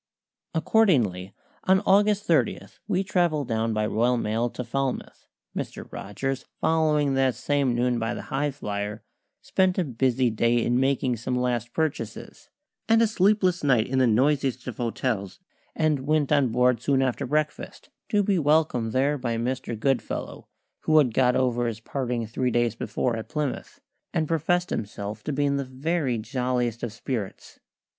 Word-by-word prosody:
Accordingly, 125 - +2 0.3
on 190 0 +4
August 205 +1 +3
30 150 - +2 0.3
we 185 +1 +1
travelled 175 - +1
down 115 0 0
by 110 -1 0
Royal 120 +3 +1
Mail 115 +2 0
to 125 - -6
Falmouth, 135 +2 -3 0.3
Mr. - - -5
Rogers 130 +7 -4 0.2
following 150 -3 +2
that 135 -2 +2
same 140 -4 0
noon 120 0 +1
by 115 +1 -2
the - - -6
Highflyer; 110 -7 -3 0.4
spent 185 -1 +1
a 185 - +2
busy 130 -2 +1
day 115 +2 +2
in 120 +1 +2
making 130 -2 +1
some 125 +3 -3
last 120 -2 -1
purchases, 160 0 -4 0.4
and 225 0 +5
a 230 - +5
sleepless 195 -4 +2
night 125 -6 +3
in 130 0 0
the 130 - +4
noisiest 130 +2 +1
of 125 - -6
hotels; 115 -4 -2 0.4
and 155 -3 +1
went 155 -2 +2
on 140 -3 +4
board 125 0 +2
soon 135 0 +2
after 130 +1 -1
breakfast, 155 +3 -3 0.2
to 205 -1 +2
be 195 -2 +2
welcomed 145 -7 +2
there 140 +3 +1
by 120 -2 -2
Mr. 120 -1 -3
Goodfellow, 135 +1 -2 0.3
who 155 - +2
had 130 -7 +4
got 125 0 +3
over 120 -2 +1
his 115 -2 -4
parting 120 -1 -3
three 125 +3 -1
days 120 -2 +1
before, 120 +1 -2
at 110 - -7
Plymouth, 150 - -4 0.4
and 160 -2 +1
professed 170 +3 0
himself 105 0 -4
to - - -1
be 145 +1 0
in 140 0 +1
the 140 - -1
very 135 0 -1
jolliest 125 0 -2
of 120 - -3
spirits. 110 -2 -6
130 Hz, 160 wpm, -25 LUFS, 120-150 Hz, 0.4 s, and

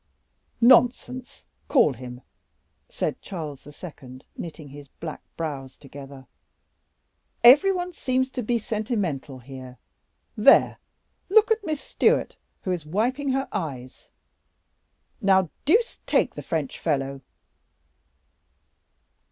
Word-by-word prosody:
"Nonsense; 250 +1 +3 0.2
call 200 - +4
him," 125 0 -9 0.7
said - - -3
Charles 150 -7 -7
II., 145 -4 -11
knitting 155 -3 -8
his 145 +1 -11
black 155 +3 -8 0.2
brows 135 -5 -5
together; 135 -1 -11 1.2
"every 280 +11 +8
one 360 -1 -3
seems 260 -3 -1
to 255 - -3
be 240 +1 0
sentimental 205 - -3
here. 130 0 -11 0.6
There, - - +5 0.5
look 440 +3 +5
at 445 -1 +2
Miss 310 -5 -3
Stewart, - - +1 0.3
who 185 - -2
is 175 -4 -2
wiping 240 - -1
her 270 0 -1
eyes, 135 -10 -6 1.1
now 190 -3 +3
deuce 445 - +2
take - - +2
the - - -7
French 155 -5 -3
fellow!" 135 -3 -1
170 Hz, 105 wpm, -25 LUFS, -, 1.2 s, every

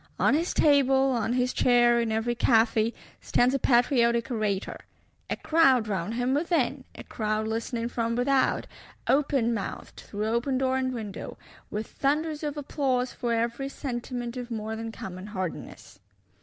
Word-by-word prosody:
On - - +3
his 330 +4 +1
table, 270 -2 +4
on 235 -2 0
his 250 0 +1
chair, 240 -1 +4
in 230 -1 -1
every 225 +2 0
café, 225 -1 +3 0.3
stands 250 +2 +2
a 275 - +1
patriotic 235 -1 +3
orator; 210 -4 -2 0.5
a - - 0
crowd 270 -8 +3
round 200 +2 -2
him 245 +2 0
within; 285 -4 0
a - - -9
crowd 215 0 -2
listening 230 +1 -2
from 230 -1 -2
without, 260 +2 +2 0.4
open 270 -4 +2
mouthed, 205 -4 -6
through 210 +1 -3
open 235 +4 0
door 260 0 +1
and 260 -1 0
window; 215 -5 -6 0.3
with 215 +1 -3
"thunders 300 +4 -1
of 300 -1 -3
applause 265 -3 -1
for 240 - -3
every 235 +4 -1
sentiment 245 -3 -5
of 245 -1 -6
more 220 -1 -4
than 225 0 -5
common 185 -2 -8
hardiness." 185 - -6
240 Hz, 155 wpm, -27 LUFS, 225-270 Hz, 0.5 s, table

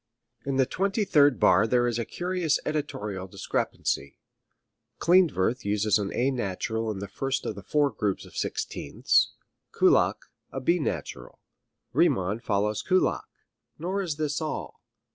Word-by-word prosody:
In 140 - 0
the 130 -1 +4
twenty 195 - -1
third 145 - +4
bar 95 +4 +5
there 120 +1 +2
is 120 -1 -1
curious 175 -4 0
editorial 105 -11 -3
discrepancy. 70 -5 -2 0.8
Klindworth 165 - +3
uses 105 +1 +2
an 100 -1 -3
A 130 +3 +2
natural 110 -1 -2
in 105 - -3
the 100 +1 -5
first 135 +7 -3
of - - -2
the 100 - -9
four 145 - +1
groups 105 -3 -2
of - - -15
sixteenths, - - 0 0.4
Kullak - - +3 0.3
a 135 - -4
B 170 +7 +2
natural; 60 - -4 0.6
Riemann 95 +4 +2
follows 105 -3 0
Kullak. 185 0 +1 0.5
Nor 185 +5 -2
is 170 -6 -2
this 150 0 -2
all. 155 - -5
125 Hz, 140 wpm, -27 LUFS, 105-155 Hz, 0.8 s, bar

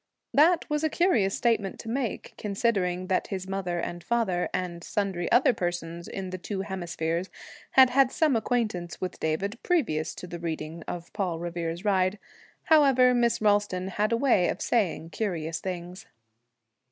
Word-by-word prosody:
That 320 +5 +4
was 300 0 -1
a 315 - +2
curious 235 - +2
statement 225 -5 0
to - - -12
make, 240 0 -3
considering 195 -4 0
that 185 0 0
his 190 -2 -5
mother 190 -3 -2
and 175 0 -5
father, 210 -7 0
and 170 -2 -3
sundry 190 -4 -2
other 245 +1 +5
persons 170 -2 -4
in 190 -2 -5
the 185 - -5
two 195 +1 -4
hemispheres, 175 -2 -3 0.4
had 260 -1 +7
had 265 0 +4
some 305 -5 +2
acquaintance 215 -7 -1
with 185 -1 -4
David 195 +9 -2
previous 170 - 0
to - - -8
the 175 -1 -7
reading 165 0 -4
of 175 -1 -6
'Paul 180 -4 -1
Revere's 170 +1 -4
Ride.' 190 0 +2 0.5
However, 275 -6 +5
Miss 235 -2 +2
Ralston 205 -3 +2
had 210 +4 0
a 230 - +3
way 235 -9 +3
of - - -3
saying 180 -8 0
curious 165 -5 -2
things. 180 0 -6
190 Hz, 160 wpm, -27 LUFS, 175-235 Hz, 0.5 s, had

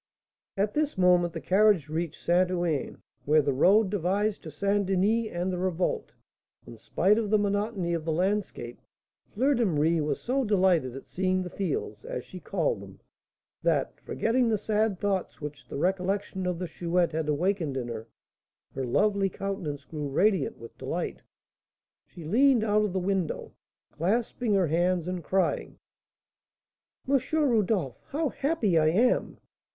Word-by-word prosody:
At 205 +1 0
this 300 -5 0
moment 180 -2 +4
the 165 - -4
carriage 190 0 +3
reached 160 +1 -3
St. 180 +1 +3
Ouen, 175 -6 -2 0.2
where 150 +1 +4
the 140 0 +1
road 190 +9 +4
divides 205 +2 0
to 160 - -9
St. 200 +7 0
Denis 205 +4 +1
and 180 +2 -2
the 180 - -3
Revolte. 185 -1 -1 0.5
In - - -10
spite 190 - +2
of 215 -3 -2
the 215 - +4
monotony 205 -3 -1
of 165 -2 -2
the 160 - -1
landscape, 185 - -2 0.5
Fleur 265 +7 +2
de 240 -3 +1
Marie 165 -3 +2
was 150 - -1
so 265 +3 0
delighted 185 - +2
at 135 - -8
seeing 185 0 0
the 180 - -7
fields, 420 - -3
as - - -5
she - - -10
called - - -1
them, - - -12 0.6
that, - - 0
forgetting 235 +1 +1
the 220 - +2
sad 210 -1 0
thoughts 195 -2 -2
which 150 -1 -8
the - - -6
recollection 190 +2 -1
of 180 -1 -1
the 180 - -3
Chouette 170 +1 0
had 155 -1 -2
awakened 160 -2 0
in 125 -2 -3
her, 115 -1 -6 0.7
her 135 - -3
lovely 200 - +2
countenance 180 -8 -4
grew 150 -2 -5
radiant 195 +7 +1
with 115 - -12
delight. - - -4 0.9
She 170 - -11
leaned 250 - +4
out 210 -1 +2
of 205 -4 -1
the 190 - 0
window, 185 -2 -2 0.4
clasping 220 +5 0
her 190 -2 +3
hands, 175 +2 +1
and 180 -2 -3
crying: 190 +4 0 1.3
"M. 275 0 +4
Rodolph, 220 - +1
how 305 +1 -1
happy 265 - +1
I 155 - +3
am! 225 +11 +2
185 Hz, 160 wpm, -28 LUFS, 165-210 Hz, 1.3 s, moment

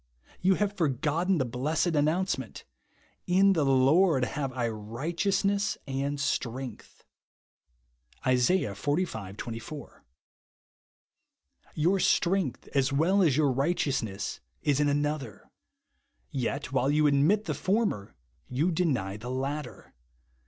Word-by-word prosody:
You 190 +1 +4
have 205 0 0
forgotten 160 +3 +1
the 130 - +1
blessed 155 +8 -1
announcement, 160 +6 -1 0.6
"In 195 +2 +5
the 160 -5 +1
Lord 135 +2 +4
have 140 0 -3
I 125 -2 -1
righteousness 170 - -1
and 140 +1 -2
strength" 130 -3 -4 1.2
(Isa. 130 +5 +3 0.2
xlv. 110 - -2
24). 120 +7 -8 1.7
Your 175 +6 +2
strength, 180 -6 +1
as 135 -1 +1
well 170 +8 +3
as 150 -7 +3
your 145 -3 +3
righteousness, 130 - -1 0.2
is 145 -2 +2
in 145 -1 +3
another; 145 -5 -2 0.8
yet, 135 +1 -3
while 130 0 +1
you 150 +1 +3
admit 150 +10 +3
the - - -1
former, 195 - -1 0.3
you 150 +8 +1
deny 130 - 0
the 120 +3 -7
latter. 135 +1 -4
145 Hz, 110 wpm, -28 LUFS, 130-175 Hz, 1.7 s, In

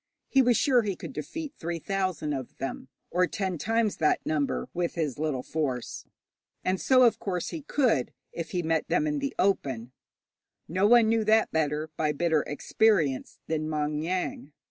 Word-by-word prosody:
He 270 - +5
was 245 -2 +4
sure 255 -4 +4
he 205 -4 -2
could 160 -6 -8
defeat 290 - -5
three 170 0 -3
thousand 185 -5 -2
of 130 -3 -6
them, 135 -1 -5 0.2
or 180 +1 +3
ten 185 0 -3
times 225 +1 +1
that 155 - +1
number, 150 -2 -1
with 175 -1 -2
his 150 -6 -2
little 150 -5 -1
force, 135 -6 -3 0.6
and 185 0 0
so, 255 -1 +5
of 235 - +4
course, 180 -4 -2
he 325 - -5
could 250 - +1 0.2
if 165 - -5
he 175 -1 -2
met 160 0 0
them - - +2
in 300 -1 0
the 280 0 -3
open; 130 - 0 0.8
no 185 +5 +2
one 235 0 +6
knew 225 0 +2
that 220 +1 +4
better, 155 0 -1
by 150 -1 +1
bitter 160 0 +2
experience, 150 -3 +1
than 155 -1 -2
Maung 150 -1 -1
Yaing. 170 -4 -3
170 Hz, 175 wpm, -28 LUFS, 150-220 Hz, 0.8 s, one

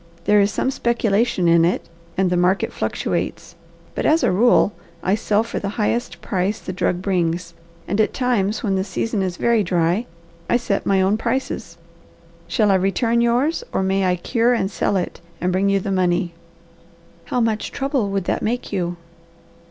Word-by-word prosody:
There 205 +3 +4
is 200 +1 +2
some 265 - 0
speculation 235 -6 +1
in 170 0 +5
it, 175 +2 0 0.3
and 185 -1 +2
the - - +2
market 180 +2 +1
fluctuates: - - -3 0.4
but, - - -3
as 320 +2 +3
a - - +3
rule, 210 +1 +4 0.3
I 185 - +2
sell 210 0 +1
for 230 - -4
the 200 - -3
highest 235 +3 -1
price 195 +2 -1
the 185 - -6
drug 180 0 -1
brings, 175 -2 -1 0.3
and, 200 +3 +1
at 215 - +1
times 225 -5 0
when 200 -4 0
the 190 - +1
season 205 +2 -2
is 185 -2 -2
very 235 -2 +2
dry, 175 +5 +1 0.4
I 240 - +4
set 210 -5 -2
my 190 -1 +3
own 195 +3 +2
prices. 230 -8 -3 0.7
Shall 210 +4 +2
I - - +4
return 230 +5 +1
yours 250 - +1
or - - 0
may 190 +1 +1
I 180 - +2
cure 230 +7 +1
and 190 -3 -1
sell 195 - 0
it, 180 - -4 0.2
and 180 +1 0
bring 190 +2 +2
you 200 0 +3
the 195 +1 -3
money?" 180 -1 +1 0.9
"How 250 - -1
much 225 -2 0
trouble 270 -6 -1
would 195 -1 -1
that - - -1
make 235 0 -2
you?" 175 -2 -2
200 Hz, 185 wpm, -21 LUFS, 185-230 Hz, 0.9 s, in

